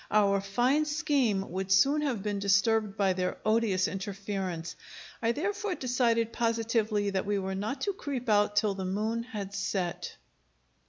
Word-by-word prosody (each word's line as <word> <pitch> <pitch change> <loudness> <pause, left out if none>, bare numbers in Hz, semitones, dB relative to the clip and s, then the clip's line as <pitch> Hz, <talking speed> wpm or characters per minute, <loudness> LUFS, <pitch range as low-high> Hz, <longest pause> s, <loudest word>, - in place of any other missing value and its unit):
Our 200 -2 +3
fine 245 +10 +1
scheme 285 - 0
would 190 +1 -3
soon 275 +11 +4
have 250 -9 -1
been 205 -1 -2
disturbed 200 +1 +2
by 195 -2 +3
their 180 0 -2
odious 215 -4 +2
interference. 195 -4 -4 0.5
I 230 0 +2
therefore 395 - -2
decided 235 -4 +1
positively 225 -3 0
that 195 0 -2
we 205 0 +1
were 190 0 -2
not 215 +8 -3
to 400 - 0
creep 275 -9 -5
out 205 -1 +3
till 210 -1 +2
the 190 -1 -5
moon 215 +5 -1
had 210 -5 -6
set.... 190 -2 -3
210 Hz, 155 wpm, -29 LUFS, 195-240 Hz, 0.5 s, soon